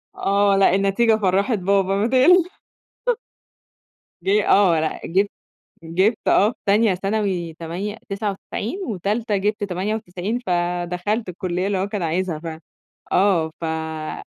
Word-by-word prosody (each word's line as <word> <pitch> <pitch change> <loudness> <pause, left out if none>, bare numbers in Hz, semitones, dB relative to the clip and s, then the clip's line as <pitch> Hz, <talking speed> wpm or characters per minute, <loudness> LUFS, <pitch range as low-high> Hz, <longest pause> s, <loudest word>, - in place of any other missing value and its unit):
آه، 200 0 +2
لأ، 190 -1 +4
النتيجة 200 +3 +3
فرَّحت 200 +3 +1
بابا، 195 +1 +2
ما 210 +3 +1
تق 340 +9 +4 1.7
جه 200 +2 +2
آه، 185 -5 +5
لأ، 155 - -2
جِبت 195 +4 +1 0.5
جِبت 190 +7 +1
آه، 205 +3 +5
في - - -18
تانية 205 0 +4
ثانوي 195 -4 -2
تمانية 180 +7 -5
تسعة 200 +1 -2
وتسعين، 220 - -5
وتالتة 210 +2 -1
جِبت 205 +2 -1
98، 200 +2 -3
فدخلت 180 +2 -1
الكلية 180 +1 -2
اللي 200 -2 0
هو 190 +2 -1
كان 200 -2 -4
عايزها 170 -1 -1
فعلًا، 160 -1 -7 0.5
آه، 180 -4 +3
ف - - -6
أ 160 -1 -4
195 Hz, 135 wpm, -22 LUFS, 175-210 Hz, 1.7 s, آه